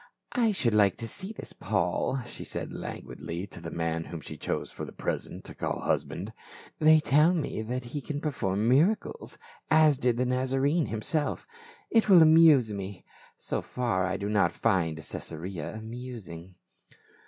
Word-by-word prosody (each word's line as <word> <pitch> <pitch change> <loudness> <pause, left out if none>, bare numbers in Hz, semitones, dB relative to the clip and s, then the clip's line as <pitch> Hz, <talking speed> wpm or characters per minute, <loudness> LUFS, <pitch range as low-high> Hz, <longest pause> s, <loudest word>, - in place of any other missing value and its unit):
" - - -57
I 230 -3 +2
should 125 - +1
like 100 -2 +4
to 115 - -4
see 190 - -4
this 225 - -9
Paul," 105 +6 -1
she - - -8
said - - -5
languidly 85 +3 -6
to 90 -3 -11
the 80 - -6
man 80 0 -2
whom 85 - -7
she - - -8
chose - - -3
for - - -7
the - - -6
present - - -4
to - - -9
call - - -3
husband. - - -2 0.5
"They 155 0 +7
tell 155 +4 +4
me 150 -8 -2
that 125 +3 -3
he 130 +5 -5
can 145 +1 -4
perform 105 -9 -1
mira 155 - +5
cles, 215 - -9 0.3
as 155 -3 +5
did 125 -3 +1
the 125 - +1
Nazarene 135 +5 +1
himself 145 +8 -1 0.5
It 225 -2 +3
will 180 -4 +9
amuse 155 -8 +6
me; 100 -2 -6 0.3
so - - -3
far 115 -7 -1
I 95 +1 -1
do 100 - -3
not 105 -5 +2
find 85 -4 +1
Caesarea 80 +3 -5
amusing." 110 -7 -8
120 Hz, 170 wpm, -28 LUFS, 95-150 Hz, 0.5 s, will